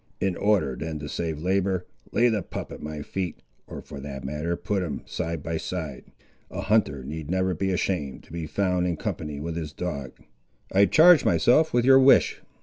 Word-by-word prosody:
In 95 -2 0
order 100 -11 +1
then 80 -1 -4
to 75 0 -6
save 80 0 -3
labour, 95 0 0 0.3
lay 120 - +4
the 110 -4 +1
pup - - -7
at - - -9
my 75 -1 -5
feet, 90 -2 -4 0.2
or - - -8
for 70 - -9
that 70 -1 -7
matter 75 +5 -2
put 100 +2 -2
him, 75 -7 -4
side 80 -2 -4
by 80 -1 -2
side. 80 -5 -5 0.4
A - - -5
hunter 70 -12 +1
need 75 +2 -6
never 95 +1 +1
be 95 +3 -1
ashamed 85 -7 -2
to - - -19
be 85 -2 -4
found 90 -1 0
in 85 -2 -1
company 75 -2 -4
with 80 +2 -4
his 80 -3 -4
dog!" 70 -8 -4 0.6
"I 100 +1 +5
charge 165 - +7
myself 155 +6 +4
with 120 0 +2
your 135 0 +8
wish." 135 +1 +5
85 Hz, 195 wpm, -26 LUFS, 75-95 Hz, 0.6 s, your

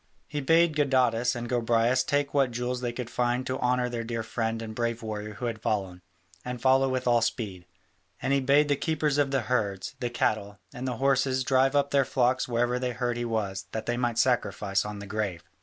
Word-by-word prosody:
He 145 0 -3
bade 165 +3 +4
Gadatas 125 -4 +2
and 120 0 -4
Gobryas 120 +1 +2
take 145 +1 0
what 135 -3 +3
jewels 125 +1 -3
they 120 -1 -1
could 120 0 -5
find 125 +1 0
to 130 +1 -3
honour 125 0 +1
the 120 -1 -3
dear 115 0 -3
friend 115 0 -2
and 110 -1 -6
brave 115 0 -2
warrior 105 -1 -5
who 125 - -5
had 115 -2 -3
fallen, 95 -5 -2 0.4
and 125 0 -5
follow 135 +1 +4
with 130 0 -2
all 120 -1 +4
speed: 100 -6 -3 0.5
and 135 - 0
he 140 - +4
bade 140 +3 +4
the 145 - +2
keepers 150 -1 0
of 145 -1 +2
the 135 -2 +1
herds, 105 -5 -1
the 120 - -2
cattle, 105 -3 -1 0.2
and 125 +2 -5
the 125 -2 -2
horses 130 0 +2
drive 135 +1 +3
up 140 0 +2
their 140 -1 +4
flocks 130 -1 +1
wherever 120 +1 0
they 125 -1 -2
heard 120 0 -1
he 120 0 -2
was, 100 -4 -2
that 110 -1 -4
he 120 - +1
might 120 -2 -1
sacrifice 105 -6 +1
on 105 0 -5
the 100 - -7
grave. 100 -4 -3
120 Hz, 215 wpm, -27 LUFS, 110-130 Hz, 0.5 s, bade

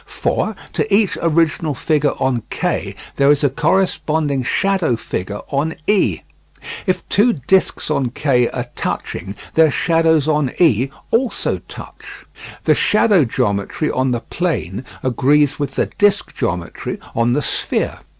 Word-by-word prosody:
For 215 - -1 0.2
to 215 - -1
each 200 0 +3
original 160 -2 +1
figure 150 0 +1
on 130 -3 0
K - - -2 0.2
there 140 0 +4
is 145 0 +3
a 140 - +3
corresponding 155 -4 0
shadow 185 - +1
figure 100 -2 -5
on 145 +3 -1
E. 205 -1 +2 0.7
If 185 - -1
two 230 +4 +3
discs 155 +3 +1
on 135 -4 0
K 125 -2 +1
are - - -4
touching, 95 +3 -4 0.2
their 160 -1 +5
shadows 160 -1 +2
on 150 -4 +1
E 135 - +3 0.2
also 240 +1 0
touch. - - -11 0.4
The - - +4
shadow 205 -7 +3
geometry 100 +6 -1
on 130 +1 0
the 120 -2 -1
plane 120 - -3 0.2
agrees 140 +3 +2
with 140 -2 -3
the - - +1
the - - -14
disc 205 -1 +2
geometry 90 -9 -3 0.2
on 115 +1 +2
the 145 +2 0
sphere. - - -1
145 Hz, 140 wpm, -18 LUFS, 125-170 Hz, 0.7 s, their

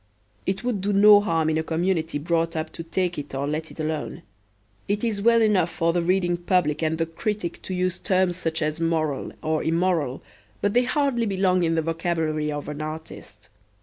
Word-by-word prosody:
It 190 +4 -1
would 240 -6 -1
do 205 +2 0
no 205 +1 +8
harm 165 -6 +1
in 160 - +1
a - - -1
community 165 -1 -1
brought 165 +2 0
up 160 0 -3
to - - -7
take 175 0 -2
it 145 -1 -7
or 135 +1 -1
let 155 +2 -3
it - - -14
alone. 155 -1 -3 0.6
It 205 +2 -1
is 215 -4 -1
well 230 +1 +5
enough 195 -6 +3
for 165 0 0
the 175 - +1
reading 175 0 +1
public 175 -4 +1
and 160 0 0
the 165 - 0
critic 175 +2 -4
to 185 - -4
use 180 -1 -1
terms 185 -2 +1
such 165 -2 -2
as 155 +2 -2
moral 155 -4 -1
or 155 0 0
immoral, 165 -5 0 0.4
but 205 0 0
they 245 +1 +3
hardly 265 -5 +1
belong 185 -2 +2
in 165 -1 +1
the 160 - +1
vocabulary 165 -2 -1
of 145 -1 -5
an 150 0 -5
artist. 155 -9 -8
165 Hz, 200 wpm, -24 LUFS, 160-190 Hz, 0.6 s, no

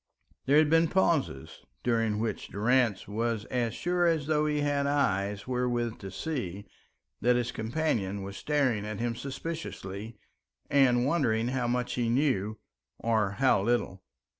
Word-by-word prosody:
There 140 +2 +5
had 155 0 +6
been 165 0 +5
pauses, 160 - 0 0.2
during 115 -3 +1
which 110 +1 -3
Durrance 115 0 +1
was 110 +1 -2
as 120 -3 0
sure 175 0 +1
as 160 -4 +1
though 150 0 +1
he 150 -1 0
had 145 -1 +1
eyes 100 -8 0
wherewith 120 -2 -1
to 95 - -7
see, 100 - -4 0.6
that 125 +1 +4
his 125 0 0
companion 110 -6 -1
was 100 +1 -7
staring 130 -6 0
at 105 -1 -5
him 120 0 -1
suspiciously 120 - -6 0.5
and 125 -3 +4
wondering 125 -7 +1
how 125 -2 -1
much 125 0 -1
he 120 -2 0
knew, 115 -5 +1 0.4
or 110 -4 +1
how 130 -4 +3
little. 100 -4 0
120 Hz, 145 wpm, -29 LUFS, 110-140 Hz, 0.6 s, had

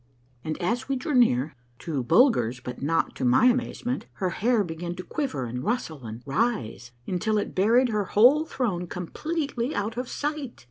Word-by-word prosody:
And 155 -1 -4
as 235 +9 -1
we 275 - +1
drew 265 +4 -3
near, 155 - +3 0.2
to 150 -2 -3
Bulger's 130 - +3
but 125 0 -7
not 165 +4 0
to - - -4
my 125 - +4
amazement, 250 0 0
her 185 -3 -2
hair 230 +3 +2
began 170 0 -5
to 185 - -7
quiver 265 - -3
and 125 +2 -5
rustle 160 - -2
and 110 +3 -8
rise, 135 - -1 0.2
until 215 +4 0
it 205 - -2
buried 235 +7 +4
her 210 -2 0
whole 250 +11 +5
throne 205 - -2
completely 275 - -3
out 215 +3 -2
of 250 0 -3
sight. 290 -4 -4
210 Hz, 175 wpm, -26 LUFS, 155-250 Hz, 0.2 s, whole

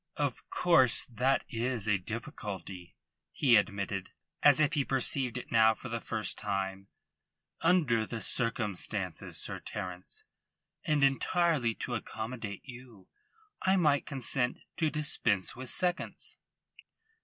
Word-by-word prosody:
"Of - - -2
course 130 -10 +4
that 125 +4 +1
is 115 -2 -2
a 105 -2 +2
difficulty," 95 -3 -7 0.4
he 130 -5 +4
admitted, 100 -2 0 0.3
as 145 0 +6
if 155 0 +3
he 145 -4 +2
perceived 130 -2 +1
it 125 - -8
now 110 -1 +5
for 125 - -9
the 115 0 -3
first 110 -2 -2
time. 95 -1 -3 0.7
"Under 150 - +3
the 115 - -5
circumstances, 115 -5 -1
Sir - - -2
Terence, 90 0 -7 0.6
and 150 -2 +1
entirely 140 -3 +2
to 125 - -5
accommodate 110 -2 -5
you, 120 -6 -13 0.5
I 190 +1 +3
might 150 -6 +2
consent 130 -2 -1 0.2
to 160 - +2
dispense 115 -10 0
with 130 0 -7
seconds." 180 -1 0
120 Hz, 120 wpm, -31 LUFS, 105-135 Hz, 0.7 s, as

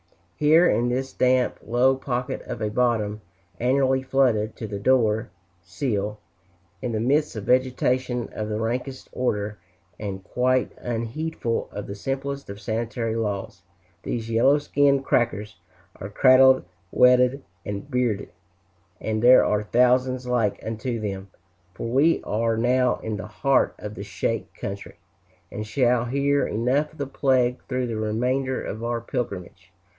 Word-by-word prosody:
Here 160 +4 +5
in 120 +1 +2
this 130 +2 -2
damp, 125 0 +2
low 125 +3 +3
pocket 130 0 -3
of - - -5
a 105 -1 -2
bottom, 110 -3 0 0.4
annually 130 +1 +2
flooded 125 -5 +1
to 115 - -6
the 100 -1 -5
door 110 -2 +2 0.3
sill, 105 +3 -3 0.6
in 120 - -3
the 110 - -1
midst 140 +6 +1
of 110 - -5
vegetation 125 0 +1
of 110 0 -4
the 105 0 -2
rankest 125 +4 -3
order, 105 -4 -2 0.4
and 95 -3 -5
quite 130 +5 +1
unheedful 120 +2 -3
of 105 - -6
the 100 - -6
simplest 135 +5 -4
of 100 0 -7
sanitary 115 +1 -2
laws, 100 -4 -3 0.4
these 115 +2 -4
yellow 130 +6 +4
skinned 140 -2 +2
"crackers" 110 -2 0 0.4
are 95 - -7
cradled, 130 +4 +6 0.3
wedded, 125 +2 +4 0.2
and 105 +8 -6
biered. 120 -5 0 0.7
And 110 0 -2
there 125 +2 +7
are 105 0 +1
thousands 125 +3 +2
like 120 -5 0
unto 115 +2 -3
them, 100 -2 -5 0.5
for - - -5
we 140 +8 +3
are 115 +1 0
now 125 +2 +2
in 110 -1 -3
the 95 - -6
heart 135 +6 +1
of 105 0 -7
the 100 - -7
"shake" 100 +3 -3
country, 100 0 -7 0.6
and 110 +1 -5
shall 125 -1 +2
hear 140 +3 +1
enough 130 +7 0
of - - -18
the 140 - -2
plague 130 -2 +1
through 125 -1 -1
the 115 -2 -3
remainder 125 +5 -1
of 110 +2 -6
our 120 0 -1
pilgrimage. 100 -7 -5
120 Hz, 145 wpm, -24 LUFS, 110-130 Hz, 0.7 s, there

